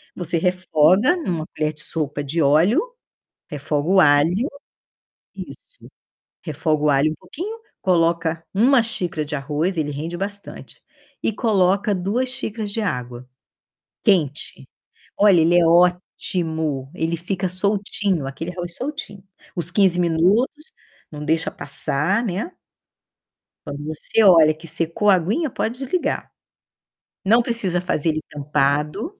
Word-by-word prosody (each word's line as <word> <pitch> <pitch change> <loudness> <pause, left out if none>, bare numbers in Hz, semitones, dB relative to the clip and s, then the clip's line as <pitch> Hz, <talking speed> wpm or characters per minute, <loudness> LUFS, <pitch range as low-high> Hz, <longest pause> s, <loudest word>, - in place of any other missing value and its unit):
você 175 -1 -2
refoga 185 - +3
numa 170 - -3
colher 155 0 0
de 150 - 0
sopa 145 -2 0
de 160 +4 -1
óleo, 155 - +4 0.7
refoga 145 +1 -2
o 190 0 +5
alho 160 - +3 0.9
isso, - - -12 0.5
refoga 155 -1 -1
o 150 - +4
alho 140 +3 +3
um - - -4
pouquinho, 360 - -7 0.2
coloca 165 -2 +1
1 245 +5 +5
xícara 180 -8 -2
de 150 +1 -6
arroz, 150 +6 -2
ele 150 -2 -1
rende 160 +5 -5
bastante, 200 +2 -6 0.4
e - - 0
coloca 200 -1 +1
2 210 +8 -1
xícaras 220 -4 -4
de 225 - -2
água 125 - -4 0.8
quente. 150 - 0 0.5
Olha, 195 -5 +5
ele 170 +2 +4
é 170 - +4
ótimo, 165 -4 +1
ele 165 +1 -1
fica 185 +2 -3
soltinho, 195 -4 -1
aquele 165 +6 -6
arroz 175 -1 -6
soltinho. 260 -8 -6 0.3
Os 170 -4 -3
15 190 -4 +3
minutos 190 - +1 0.4
não 150 0 -7
deixa 160 +1 +1
passar, 155 - -1
né. 205 - -3 1.1
Quando 145 +1 -6
você 155 +8 +1
olha 165 -5 +7
que 165 +2 -12
secou 165 +6 0
a 190 - +7
aguinha, 215 - -1
pode 240 +2 -3
desligar. 275 +7 -2 0.9
Não 230 +4 +5
precisa 210 -8 0
fazer 165 -3 -1
ele 155 0 -1
tampado, 150 - -1
175 Hz, 130 wpm, -21 LUFS, 155-205 Hz, 1.1 s, olha